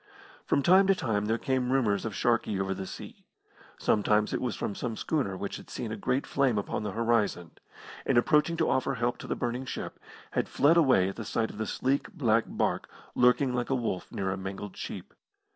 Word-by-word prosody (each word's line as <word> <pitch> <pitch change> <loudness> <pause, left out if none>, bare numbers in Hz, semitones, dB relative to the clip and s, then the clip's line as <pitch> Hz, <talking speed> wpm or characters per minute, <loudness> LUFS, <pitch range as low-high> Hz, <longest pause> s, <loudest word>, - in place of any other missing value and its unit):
From 140 - +1
time 190 +4 +6
to 195 - +5
time 105 - -1
there 115 +1 +1
came 130 0 0
rumours 110 -7 +2
of 110 -3 -4
Sharkey 115 -3 +1
over 95 0 0
the 95 0 -6
sea. - - -9 0.5
Sometimes 105 0 +2
it - - -1
was 125 -4 -1
from - - -3
some 115 +1 -4
schooner 125 -12 -1
which 100 +1 -4
had - - -13
seen 115 - -5
a - - -2
great 125 +5 -1
flame 135 -5 +1
upon 100 - -2
the 105 -2 -4
horizon, 110 -7 0 0.5
and - - +2
approaching 150 +6 +3
to 160 - +2
offer 135 +1 +1
help 120 0 -1
to - - -8
the - - -1
burning 120 +2 -2
ship, - - -6 0.3
had - - -1
fled 150 +4 +4
away 130 - +4
at 95 - -8
the 115 - -4
sight 110 +1 -1
of 105 - -11
the 110 - -2
sleek, 135 +6 -1
black 115 -4 +2
barque, - - -1 0.2
lurking 125 +1 +3
like 125 -1 -1
a 135 - +2
wolf 115 -7 -3
near 95 -1 -2
a 95 - -3
mangled 95 +1 -6
sheep. - - -7
115 Hz, 210 wpm, -29 LUFS, 105-130 Hz, 0.5 s, time